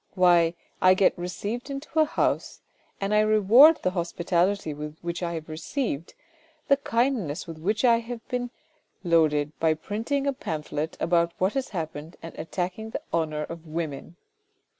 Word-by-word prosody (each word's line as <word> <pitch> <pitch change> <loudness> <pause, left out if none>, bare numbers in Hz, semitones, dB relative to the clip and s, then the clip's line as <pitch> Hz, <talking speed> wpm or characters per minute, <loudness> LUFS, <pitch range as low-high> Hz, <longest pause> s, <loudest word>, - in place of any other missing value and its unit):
Why! 175 -2 +4 0.3
I 185 0 +6
get 190 - +3
received 205 +8 -5
into 280 +3 -3
a 310 - +6
house, - - -1 0.4
and 195 +1 -1
I 210 - +5
reward 215 +9 +7
the 185 - +2
hospitality 175 +1 0
which 155 +4 -6
I 170 -1 -2
have 160 -1 -6
received, 165 - -4 0.5
the 275 - +6
kindness 230 - -1
with 165 -2 -9
which 210 +8 0
I 235 -1 +5
have 235 0 -8
been 245 -1 -2 0.5
loaded 155 -4 +3
by 160 -1 +3
printing 230 - -2
a 280 - +1
pamphlet 155 - -4
about 170 0 +2
what 190 +2 +1
has 270 -1 -2
happened 160 -3 -5
and 165 - -8
attacking 185 +6 -4
the - - -4
honour 155 -2 0
of 165 +1 -8
women 155 -1 -5
180 Hz, 155 wpm, -26 LUFS, 160-225 Hz, 0.5 s, reward